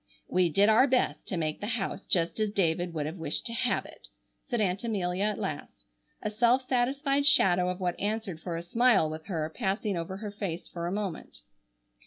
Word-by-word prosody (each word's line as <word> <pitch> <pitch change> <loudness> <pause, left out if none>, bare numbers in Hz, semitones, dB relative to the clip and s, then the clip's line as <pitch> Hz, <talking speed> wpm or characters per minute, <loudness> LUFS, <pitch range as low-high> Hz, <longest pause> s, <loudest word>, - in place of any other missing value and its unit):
"We 180 -1 +2
did 200 +6 +4
our 220 +5 +5
best 255 -1 0
to 185 - -2
make 155 -2 -2
the 205 - -3
house 195 -1 -4
just 170 +1 +2
as 215 -1 +1
David 175 -3 0
would 155 -3 -3
have 160 +4 -5
wished 160 -3 -1
to 230 - -3
have 245 +1 0
it," - - -13 0.4
said 240 - 0
Aunt 195 -1 0
Amelia 195 -4 -1
at 210 -1 0
last, 190 -8 -6 0.4
a 210 - -2
self 240 +4 +2
satisfied 275 +3 +1
shadow 180 -9 +5
of 180 +1 -4
what 180 -2 -2
answered 205 -4 -3
for 175 -2 -4
a 165 - -4
smile 210 -4 +3
with 155 +2 -8
her, 160 -5 -3
passing 205 -2 -1
over 170 +3 -4
her 210 0 -6
face 195 -5 -5
for 170 -1 -5
a - - -2
moment. 195 - -5
195 Hz, 205 wpm, -29 LUFS, 175-220 Hz, 0.4 s, our